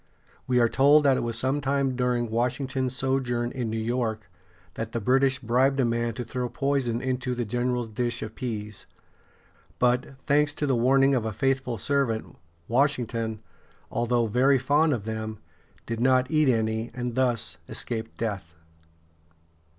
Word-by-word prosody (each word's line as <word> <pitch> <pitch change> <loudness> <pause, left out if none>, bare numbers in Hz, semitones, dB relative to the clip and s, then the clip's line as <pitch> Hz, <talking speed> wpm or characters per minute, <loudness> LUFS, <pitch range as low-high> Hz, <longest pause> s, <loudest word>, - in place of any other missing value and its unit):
We 125 -1 +3
are 120 - +5
told 145 +5 +5
that 135 -2 +4
it - - 0
was 115 -1 -1
sometime 135 +1 0
during 120 -2 0
Washington's 130 +2 -1
sojourn 125 -2 -1
in 125 -4 -3
New 110 - -2
York 110 -3 -2 0.4
that 115 0 -5
the 115 - -1
British 130 +4 +3
bribed 130 +3 +1
a 130 - +3
man 115 -1 -1
to 120 - -4
throw 125 +1 -3
poison 135 -4 -1
into 130 -1 -2
the 120 -1 -2
general's 120 +2 -1
dish 120 +2 -1
of 110 - -7
pease. 105 -5 -5 0.9
But, 125 +2 +1
thanks 145 +1 +3
to 150 - -1
the 135 -3 +2
warning 135 +3 +4
of 125 -4 +1
a 110 - -2
faithful 130 0 -1
servant, 130 -2 -1 0.3
Washington, 115 -4 0 0.5
although 120 0 +1
very 130 +5 +3
fond 145 +5 +2
of 120 -8 -1
them, 110 0 -4 0.5
did 115 -1 -4
not 130 +2 +3
eat 155 -3 +3
any, 110 -1 0
and 125 -1 -3
thus 120 -10 0
escaped 115 -2 -5
death. 100 -7 -4
125 Hz, 155 wpm, -26 LUFS, 115-135 Hz, 0.9 s, are